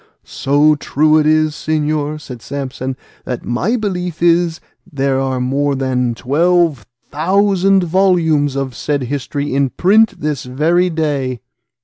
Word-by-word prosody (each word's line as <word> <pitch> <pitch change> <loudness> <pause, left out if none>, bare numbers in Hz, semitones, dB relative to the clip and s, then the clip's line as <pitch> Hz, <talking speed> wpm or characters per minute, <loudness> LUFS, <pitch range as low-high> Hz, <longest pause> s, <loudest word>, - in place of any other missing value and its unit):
"So 145 +3 +2
true 155 +1 +2
is 155 - +1
it, 155 0 +3 0.2
señor," 150 -1 -1
said 125 -5 -10
Samson, 130 -1 -5 0.3
"that 125 -2 -5
my 170 - 0
belief 180 -7 -3
is 170 -1 +2 0.3
there 135 -2 0
are 130 -1 -1
more 140 +3 0
than 125 -3 -1
twelve 155 0 +1 0.2
thousand 195 +4 +2
volumes 165 -6 +2
of 135 -1 -2
the - - -18
said 145 -2 -1
history 140 +2 -3
in 135 0 +1
print 210 - +2
this 150 -3 -2
very 160 +8 +1
day. 145 -6 -2
150 Hz, 135 wpm, -16 LUFS, 135-170 Hz, 0.3 s, it